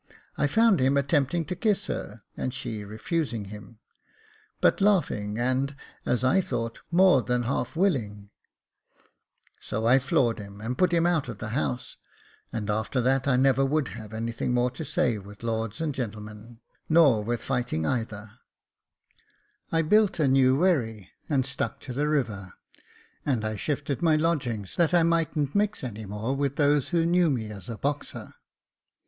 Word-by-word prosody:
I 145 - +1
found 225 +4 +4
him 135 +2 +3
attempting 145 +3 +1
to 180 - -4
kiss 210 +1 0
her, - - -5
and 130 - -3
she 110 -5 -5
refusing 110 - -3
him 105 +2 -11 0.4
— 435 0 -32
but - - +3
laughing, 140 - +1
and, 130 +3 0 0.3
as 125 0 +1
I 185 +9 +4
thought, 115 -7 -4
more 180 -5 +5
than 125 +2 0
half 125 +6 -2
willing; 105 - -1 1.3
so 110 +2 -3
I 125 +3 +6
floored 125 -3 +1
him, 100 0 -10
and 115 +4 -3
put 185 +2 +2
him 170 -1 +3
out 165 -7 +1
of 115 - -6
the 110 +1 -6
house, 125 0 -3 0.5
and 105 -3 -4
after 110 +4 -1
that 135 +2 +1
I 135 - +4
never 135 +1 +3
would 140 0 0
have 110 -1 -9
anything 115 +2 -2
more 125 0 +2
to 160 - -6
say 125 -6 0
with 100 +2 -13
lords 115 -1 -2
and 160 -2 -1
gemmen, 110 -1 -7 0.3
nor 145 -10 +5
with 120 +2 -2
fighting 125 -11 -1
either, 110 -1 -3 1.3
I 165 0 +2
built 210 +5 +3
a 150 - +3
new 130 -1 +4
wherry 115 - 0 0.2
and 135 -4 +2
stuck 130 -3 -3
to 130 - -7
the 145 +4 0
river, 105 -10 -1 0.7
and 125 -7 0
I 110 0 -2
shifted 140 +3 -2
my 165 -2 +4
lodgings, 140 - -1
that 170 0 +3
I 170 - +5
mightn't 160 -4 +1
mix 205 -3 0
any 110 -4 -6
more 105 +6 -2
with 140 0 -1
those 145 -2 +2
who 170 -2 +2
knew 175 0 +3
me 110 -6 -2
as 100 -1 -9
a 115 - -5
boxer. 145 +6 -4
130 Hz, 165 wpm, -27 LUFS, 110-155 Hz, 1.3 s, I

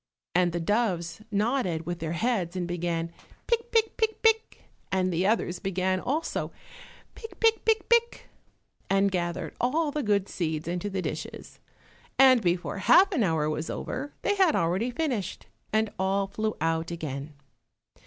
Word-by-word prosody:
And 180 0 +3
the 170 - -2
doves 175 -2 0
nodded 205 -6 0
with 175 +1 -4
their 160 0 -3
heads 190 -2 0
and 180 -2 -2
began 170 -1 -2 0.3
pick, 470 0 0
pick, 450 -2 +2
pick, 440 -1 0
pick, 445 0 +2 0.3
and 185 -1 +1
the 180 +3 +1
others 185 -5 0
began 185 -1 0
also 300 - -2 0.6
pick, 450 - -11
pick, 450 -1 +3
pick, 445 -1 +2
pick, 470 0 +2 0.6
and 195 0 +3
gathered 175 -2 -2
all 295 +5 +1
the 300 - -2
good 205 -4 +1
seeds 160 -3 -3
into 180 +4 -2
the 190 -1 -3
dishes, - - -6 0.6
and 260 -3 +7
before 180 +1 -1
half 380 - +6
an 320 -10 +1
hour 160 -6 +1
was 155 +1 -2
over 285 +3 -4
they - - +2
had 380 -6 +4
already 180 +8 +1
finished, 245 - -2 0.3
and 220 0 +1
all 195 +1 +1
flew 215 +2 -3
out 165 +1 0
again. 150 -3 -5
195 Hz, 155 wpm, -27 LUFS, 170-265 Hz, 0.6 s, and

